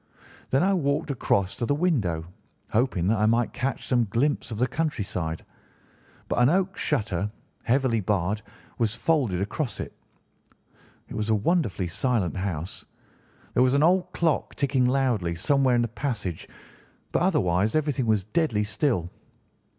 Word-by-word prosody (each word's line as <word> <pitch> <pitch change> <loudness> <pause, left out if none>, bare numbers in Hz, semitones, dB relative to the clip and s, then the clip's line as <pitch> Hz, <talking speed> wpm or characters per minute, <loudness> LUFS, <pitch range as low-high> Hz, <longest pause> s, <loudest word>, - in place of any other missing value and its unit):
Then 135 +4 +3
I 195 +1 +3
walked 140 -5 0
across 100 -7 0
to 120 - -1
the 145 - +2
window, 110 - 0 0.5
hoping 110 -6 +1
that 110 -1 +2
I 105 - +3
might 115 +1 +2
catch 135 +1 -2
some 120 -2 +2
glimpse 135 +8 0
of 110 - -5
the 125 - +3
country 140 -2 -1
side, 80 -4 -4 0.8
but - - -2
an 125 - +6
oak 185 +3 +1
shutter, 105 - -1 0.4
heavily 125 -2 +2
barred, 100 +1 0 0.4
was 115 -1 +1
folded 130 - +1
across 115 +6 -3
it. - - -5 1.1
It - - -9
was 110 0 -2
a 110 - +4
wonderfully 110 - 0
silent 105 0 0
house. 90 -3 -4 0.7
There - - +3
was 130 +1 +4
an 140 - +4
old 180 +2 +3
clock 165 -3 0
ticking 140 -3 +1
loudly 125 -10 +1
somewhere 130 +7 +2
in 120 - +3
the - - 0
passage, 115 - -4 0.6
but - - +1
otherwise 110 - +2
everything 145 -5 0
was 110 -3 +2
deadly 110 - 0
still. 105 - 0
120 Hz, 155 wpm, -26 LUFS, 100-140 Hz, 1.1 s, an